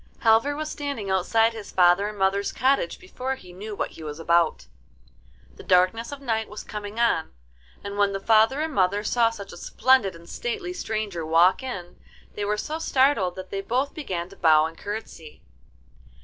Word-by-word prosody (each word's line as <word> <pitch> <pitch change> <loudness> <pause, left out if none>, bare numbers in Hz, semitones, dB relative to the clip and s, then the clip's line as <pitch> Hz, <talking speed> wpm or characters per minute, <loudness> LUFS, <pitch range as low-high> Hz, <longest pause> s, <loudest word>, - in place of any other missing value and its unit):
Halvor 230 +6 +4
was 305 +1 -4
standing 280 -9 -4
outside 225 +5 +2
his 220 -2 -8
father 180 +2 +4
and 210 0 -7
mother's 195 +1 +1
cottage 260 -9 +1
before 255 +8 -5
he 180 -8 -14
knew 205 +3 -7
what - - -3
he 160 - -11
was 150 0 -6
about. 170 0 +2 0.9
The - - -10
darkness 185 +7 +2
of 285 - -7
night 225 -5 -2
was 210 - -8
coming 210 +1 -7
on, 230 -9 +1 0.5
and 200 0 -5
when 200 -1 +3
the 195 - -3
father 225 +7 +4
and 315 0 -2
mother 200 -1 +1
saw 230 +1 +3
such 205 -4 -9
a - - -10
splendid 255 -9 +2
and 170 0 -14
stately 425 - -4
stranger 215 - -3
walk 165 +6 +4
in, 180 -10 -7 0.4
they 205 - -4
were 210 +1 0
so 310 +9 -4
startled 260 - +2
that 185 0 -9
they 195 - -2
both 255 +7 -1
began 185 - -4
to 195 - -14
bow 155 -3 +5
and 165 +1 -6
curtsey. 200 -6 -8
205 Hz, 185 wpm, -25 LUFS, 185-245 Hz, 0.9 s, bow